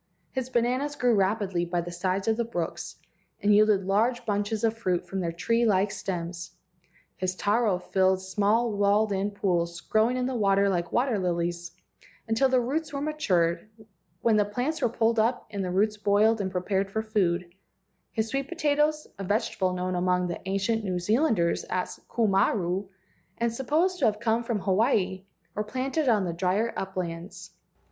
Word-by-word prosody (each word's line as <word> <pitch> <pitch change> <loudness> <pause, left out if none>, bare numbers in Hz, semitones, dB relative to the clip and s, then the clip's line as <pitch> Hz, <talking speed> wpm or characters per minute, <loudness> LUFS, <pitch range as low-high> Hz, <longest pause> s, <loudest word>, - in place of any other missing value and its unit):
His 255 +3 -3
bananas 255 +4 0
grew 245 -1 +2
rapidly 195 -3 +1
by 175 0 -1
the 175 +1 -7
sides 185 +3 -2
of 220 - +3
the 235 - 0
brooks, 175 -8 -4 0.4
and 205 0 +3
yielded 205 -2 +4
large 225 +6 +1
bunches 205 +1 -1
of 225 0 +2
fruit 185 -6 -1
from 195 - -4
their 170 -2 -1
tree 230 +8 0
like 200 -2 +2
stems; 175 -1 -5 0.6
his 185 0 -2
taro 210 -1 +1
filled 190 +1 +1
small 205 +5 +1
walled 205 +1 +2
in 195 +1 0
pools, 175 -4 -1
growing 220 +7 +1
in 250 - 0
the 260 - -2
water 200 -3 +3
like 175 -3 -1
water 240 -4 +1
lilies, 175 -1 -2 0.5
until 225 +4 +2
the 255 -1 +3
roots 290 +6 -2
were 280 - -3
matured, 190 - 0 0.5
when 225 -2 +3
the 210 - +4
plants 250 +10 -3
were 245 - +2
pulled 230 0 +1
up 235 +3 +1
and 200 -2 -3
the 180 - -2
roots 210 +4 +1
boiled 210 +2 +3
and 190 - -2
prepared 190 +1 -1
for 220 +2 -2
food; 180 -5 0 0.6
his 220 -1 -1
sweet 275 +3 -2
potatoes—a 300 - 0
vege¬ 210 +5 0
table 185 -1 0
known 180 0 -2
among 180 0 +1
the 175 -1 -4
ancient 200 +3 0
New 185 -3 -1
Zealanders 210 - +1
as 185 - -3
ku 230 -1 +1
maru, 190 -1 +1 0.5
and 235 -1 0
supposed 320 +9 0
to 275 - +2
have 210 -1 +1
come 230 0 +1
from 230 -4 -2
Hawaii—were 195 -1 -1
planted 260 +6 -1
on 210 -5 +3
the 170 - -2
drier 190 +6 0
uplands. 180 -2 -5
205 Hz, 170 wpm, -27 LUFS, 185-235 Hz, 0.6 s, yielded